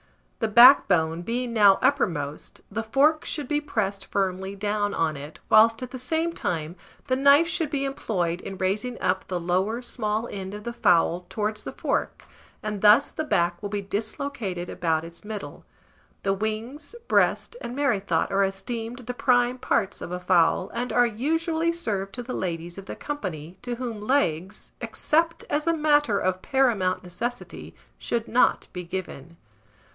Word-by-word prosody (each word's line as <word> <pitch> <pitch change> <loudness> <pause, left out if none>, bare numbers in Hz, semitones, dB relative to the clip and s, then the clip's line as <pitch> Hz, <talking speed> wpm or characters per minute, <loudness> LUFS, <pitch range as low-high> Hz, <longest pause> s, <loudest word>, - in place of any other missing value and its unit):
The 225 - +1
backbone 195 - +6
being 235 +5 -2
now 205 -3 +6
uppermost, 155 - -1
the 225 - -2
fork 280 +8 +2
should 295 -5 -4
be 295 +2 0
pressed 200 -8 -2
firmly 190 0 -2
down 205 0 -1
on 160 -2 0
it, 145 +2 -9
whilst 225 +2 +5
at 250 - -7
the 260 - -6
same 320 +6 -1
time 165 - -3 0.3
the 255 - +1
knife 280 +4 +5
should 330 -3 -1
be 280 -2 -1
employed 180 -10 -2
in 195 - -7
raising 210 +7 -1
up 185 +1 0
the 180 -1 -2
lower 190 +8 0
small 220 -1 -2
end 195 0 -6
of 210 - -8
the 235 - -5
fowl 175 -3 +2
towards 215 0 -2
the - - -5
fork, - - -2 0.4
and 210 -2 -3
thus 215 +7 +6
the 315 - -3
back 175 - 0
will 205 - -4
be 200 0 -3
dislocated 210 -3 -3
about 160 -2 0
its 170 0 -12
middle. 210 -1 -7 0.6
The 195 - +2
wings, 225 - -3
breast, - - +2
and 240 - -6
merrythought 245 -9 0
are 195 0 +3
esteemed 225 +5 -4
the 245 - -3
prime 245 0 +2
parts 195 -5 0
of - - -6
a 180 - -3
fowl, 180 0 +2
and 245 +2 -3
are 245 0 +4
usually 320 +8 0
served 200 - -3
to 245 - -5
the 250 - -6
ladies 175 0 -4
of 195 - -11
the - - -5
company, 180 - -6
to 245 -1 -4
whom 235 -4 -5
legs, 210 - -1
except 330 +2 0
as 300 +2 0
a 330 -1 +2
matter 295 -8 +3
of 185 0 -1
paramount 225 -10 +1
necessity, 235 +8 -6 0.2
should 235 -1 -2
not 250 - +2
be 180 - -5
given. 170 -3 -7
215 Hz, 170 wpm, -25 LUFS, 185-255 Hz, 0.6 s, backbone